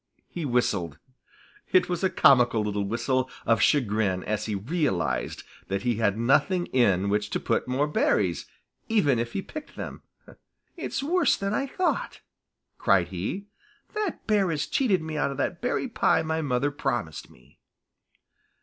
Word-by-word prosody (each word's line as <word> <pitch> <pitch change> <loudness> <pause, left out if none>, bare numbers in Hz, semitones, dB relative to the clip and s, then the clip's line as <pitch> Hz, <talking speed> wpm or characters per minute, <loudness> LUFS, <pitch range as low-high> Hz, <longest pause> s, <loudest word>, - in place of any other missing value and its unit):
He 170 -3 -5
whistled. 100 - 0 0.7
It 185 - +4
was 180 +1 -3
a 190 - +3
comical 125 -9 +4
little 105 -1 -1
whistle 130 +4 0 0.2
of 115 -3 +3
chagrin 105 -9 +2
as 105 +1 -2
he 105 - -2
realized 125 - -1 0.2
that 100 +3 -2
he 120 -3 0
had 105 -2 +1
nothing 175 - +2
in 100 -7 +3
which 105 +1 0
to - - -1
put - - -1
more 130 +3 +1
berries, 100 - +1 0.4
even 150 - +3
if 120 0 -3
he 195 - -2
picked 305 -1 -9
them. - - -7 0.7
"It's 330 -5 -4
worse 350 +5 +2
than 195 +1 -2
I 275 +6 0
thought," 325 -1 -2 0.6
cried 90 -3 +3
he. 95 - -4 0.5
"That 425 -5 -3
bear 205 -4 +2
has 155 -3 -1
cheated 200 -11 +1
me 160 -1 -4
out 145 - +1
of 140 - -6
that 170 +4 -2
berry 245 +2 -1
pie 225 -8 +2
my 160 0 -1
mother 140 0 0
promised 120 - -3
me." 65 +3 -22
130 Hz, 160 wpm, -26 LUFS, -, 0.7 s, It